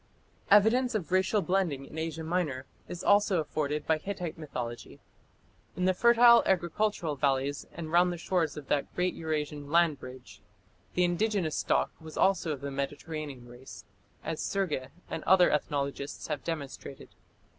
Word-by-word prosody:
Evidence 225 +4 +5
of 185 -5 -3
racial 190 +2 +2
blending 175 -8 0
in - - -13
Asia 160 0 -4
Minor 160 -6 -2 0.2
is 175 - -7
also 205 -3 +4
afforded 150 -1 -2
by 160 -1 +2
Hittite 180 -2 -5
mythology. 125 -6 -6 0.8
In 180 - 0
the 185 - +4
fertile 235 +3 +6
agricultural 175 -2 0
valleys 140 0 0
and 160 -2 -7
round 175 +1 +4
the 175 - -4
shores 165 -3 -1
of 150 - -7
that 145 -1 0
great 180 0 0
Eur 160 -1 -5
Asian 150 -1 -3
"land 165 -3 +3
bridge" 130 0 -11 0.5
the 180 - +3
indigenous 175 -2 0
stock - - +1
was 160 -1 -10
also 185 -4 +2
of 140 -3 -4
the 140 0 -4
Mediterranean 140 -1 -5
race, 120 +2 -12 0.4
as 160 - -3
Sergi 180 -10 -1 0.2
and 165 - -5
other 185 -2 +5
ethnologists 140 0 -2
have 150 -3 -3
demonstrated. 140 -4 -6
160 Hz, 155 wpm, -29 LUFS, 145-185 Hz, 0.8 s, fertile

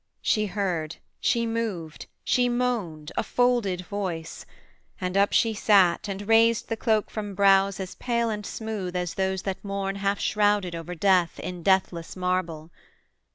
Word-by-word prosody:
She 215 -1 +2
heard, 175 -5 -2 0.2
she 235 -1 +1
moved, 220 -9 -4 0.2
She 245 -1 +2
moaned, 230 -12 -2
a - - +1
folded 240 -7 +1
voice; 180 -4 -5 0.5
and 180 0 -3
up 200 +1 +3
she 225 -1 +3
sat, 200 -5 +3
And 200 0 -5
raised 225 0 +4
the 225 - 0
cloak 220 -2 0
from 205 -2 -5
brows 195 -1 +4
as 185 -1 -5
pale 235 -2 -1
and 210 -1 -4
smooth 205 -5 -5
As 180 -1 -2
those 190 -1 -1
that 195 -1 -4
mourn 195 -1 -3
half 200 0 0
shrouded 205 -4 +1
over 170 +1 -6
death 180 -1 +2
In 180 0 -6
deathless 185 -2 +1
marble. 180 -3 -2
195 Hz, 155 wpm, -26 LUFS, 180-215 Hz, 0.5 s, raised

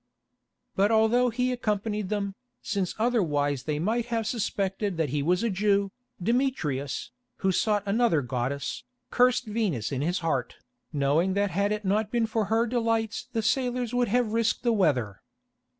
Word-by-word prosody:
But 200 +1 +3
although 225 +3 +4
he 250 +2 0
accompanied 210 -4 -2
them, 200 -2 -2 0.3
since 195 -3 -2
otherwise 150 - +1
they 150 -1 -1
might 225 +9 0
have 230 -2 -1
suspected 200 -4 -2
that 160 -3 0
he 145 +2 -1
was 180 +7 +1
a 235 - +1
Jew, 200 0 +1 0.3
Demetrius, 175 - -1 0.3
who 190 - +4
sought 210 +2 +1
another 200 - +2
goddess, 130 - -3 0.3
cursed 250 0 +3
Venus 210 - -1
in 135 -1 -2
his 175 +5 0
heart, 130 -6 -1 0.4
knowing 155 +6 +1
that 200 -1 +1
had 200 +4 +1
it 210 -1 -2
not 205 +2 +1
been 235 0 +1
for 220 -1 -1
her 225 +3 +2
delights 230 -1 -1
the 225 -3 -1
sailors 245 +1 0
would 245 -1 +2
have 235 0 +1
risked 230 0 +1
the 235 -2 +3
weather. 130 - +1
210 Hz, 160 wpm, -27 LUFS, 170-230 Hz, 0.4 s, although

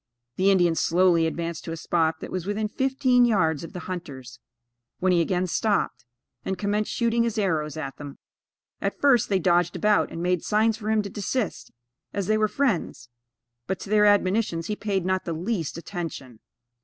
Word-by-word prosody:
The 190 +6 +3
Indian 175 -3 +4
slowly 170 0 +3
advanced 170 0 -4
to 165 - -5
a 165 - -4
spot 160 0 0
that - - -7
was 185 -1 -4
within 210 +1 -1
fifteen 260 +1 +2
yards 165 -10 +2
of 165 - -8
the 180 - -6
hunters, 140 -9 -7 0.6
when 185 0 +1
he 175 -1 +4
again 180 +2 0
stopped, 205 - -1 0.4
and 190 - -3
commenced 205 +2 -1
shooting 235 0 +1
his 230 -1 -1
arrows 160 -7 -1
at 140 -3 -5
them. 145 -1 -9 0.6
At - - -2
first 270 -6 +4
they 195 - +3
dodged 175 -1 +2
about, 210 -1 +2
and 165 - -5
made 180 -1 +1
signs 220 +1 +2
for 215 -1 -5
him 220 -1 +2
to 200 - -6
desist, 210 +2 -3 0.4
as 200 -2 -2
they 215 - +2
were 215 - +3
friends; 215 - -1 0.6
but, 190 -1 -2
to 200 - -8
their 210 -1 +5
admonitions 200 -4 +2
he 210 - -2
paid 200 -4 -2
not 185 0 0
the 170 - -2
least 170 -1 -3
attention. 165 - -6
185 Hz, 185 wpm, -25 LUFS, 165-215 Hz, 0.6 s, their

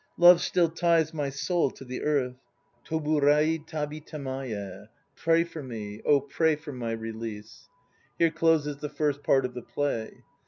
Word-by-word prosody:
Love 175 0 +8
still 175 -2 +2
ties 165 -1 +2
my 145 -3 -2
soul 160 +3 0
to 135 - -12
the 125 0 -5
earth. 130 -4 0 0.5
Toburai 155 0 +2
tabi 155 -1 -4
tamaye! 130 -10 -6 0.3
Pray 165 0 +3
for 165 -2 -8
me, 110 -5 -7
oh, 145 -1 +5
pray 155 +3 +1
for 155 0 -9
my 125 -3 -4
re 115 0 -4
lease!" 110 0 -8 0.5
Here 165 -1 +3
closes 160 -3 +2
the 150 0 -5
first 145 -1 -1
part 135 -2 +3
of 125 - -4
the 125 - -6
play. 130 -7 -3
145 Hz, 160 wpm, -27 LUFS, 125-160 Hz, 0.5 s, Love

